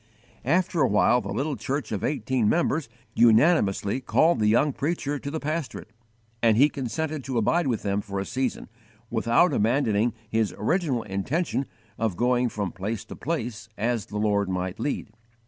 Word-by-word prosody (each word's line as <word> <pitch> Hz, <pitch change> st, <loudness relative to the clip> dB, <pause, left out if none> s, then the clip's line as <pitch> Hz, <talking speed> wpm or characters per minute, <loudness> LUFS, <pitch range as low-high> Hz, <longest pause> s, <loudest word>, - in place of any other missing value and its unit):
After 175 Hz, +3 st, +1 dB
a 130 Hz, -, +5 dB
while 120 Hz, +4 st, +3 dB
the -, -, -7 dB
little 145 Hz, +1 st, -1 dB
church 135 Hz, +5 st, -3 dB
of 105 Hz, -, -3 dB
eighteen 130 Hz, -6 st, 0 dB
members 160 Hz, -5 st, +1 dB, 0.2 s
unanimously 115 Hz, -, +3 dB
called 160 Hz, +5 st, +3 dB
the 105 Hz, -, +2 dB
young 130 Hz, +7 st, +3 dB
preacher 145 Hz, -1 st, -2 dB
to 140 Hz, -, -5 dB
the 160 Hz, +2 st, -3 dB
pastorate, 150 Hz, -7 st, -4 dB, 0.5 s
and 115 Hz, -2 st, +4 dB
he 140 Hz, +4 st, +6 dB
consented 150 Hz, +2 st, -3 dB
to 130 Hz, -3 st, -2 dB
abide 160 Hz, +8 st, +2 dB
with 120 Hz, -4 st, -1 dB
them 100 Hz, 0 st, 0 dB
for 100 Hz, -1 st, -5 dB
a 100 Hz, -, -3 dB
season, 130 Hz, +3 st, -2 dB, 0.4 s
without 120 Hz, +8 st, +3 dB
abandoning 115 Hz, -1 st, +1 dB
his 110 Hz, -4 st, 0 dB
original 135 Hz, -, 0 dB
intention 130 Hz, -, -2 dB, 0.3 s
of 110 Hz, -6 st, -1 dB
going 125 Hz, 0 st, +2 dB
from 100 Hz, -5 st, -3 dB
place 100 Hz, +4 st, -4 dB
to -, -, -9 dB
place 120 Hz, -, -4 dB
as 115 Hz, -1 st, -1 dB
the 105 Hz, -, -5 dB
Lord 100 Hz, -2 st, +1 dB
might 90 Hz, 0 st, -3 dB
lead. 140 Hz, -6 st, -3 dB
120 Hz, 165 wpm, -25 LUFS, 105-145 Hz, 0.5 s, he